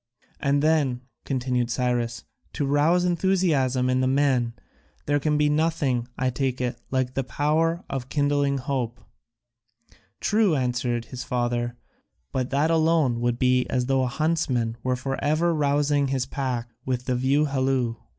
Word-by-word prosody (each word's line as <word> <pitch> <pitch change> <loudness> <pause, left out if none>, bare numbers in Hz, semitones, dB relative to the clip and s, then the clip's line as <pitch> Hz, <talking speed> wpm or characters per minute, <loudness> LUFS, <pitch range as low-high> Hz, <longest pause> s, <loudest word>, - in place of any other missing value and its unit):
"And 140 0 +1
then," 145 -6 +2 0.2
continued 125 -2 -1
Cyrus, 120 -2 -1 0.3
"to 145 - -1
rouse 155 +6 +3
enthusiasm 165 -8 +1
in 130 0 +2
the 130 - +2
men, 130 -3 +2 0.5
there 145 0 +2
can 150 +1 +1
be 150 0 +3
nothing, 150 -5 +1
I 130 0 0
take 130 0 -2
it, 120 -1 -3
like 130 -1 -1
the 135 - -1
power 155 +7 0
of 135 -2 -5
kindling 145 -1 +1
hope?" 125 -3 -3 1.2
"True," 210 -6 +2
answered 120 -2 -1
his 125 - -4
father, 120 -1 -1 0.5
"but 130 -1 -2
that 145 +4 +1
alone 160 -7 +2
would 120 0 0
be 125 0 +2
as 125 -1 0
though 135 0 +2
a 130 - +1
huntsman 130 -5 0
were 125 +1 0
for 135 +2 -4
ever 160 +4 +2
rousing 145 -1 +2
his 130 -2 -1
pack 130 -3 -3
with 125 -1 -2
the 130 - 0
view 135 +4 +2
halloo. 130 -4 0
135 Hz, 150 wpm, -25 LUFS, 125-150 Hz, 1.2 s, rouse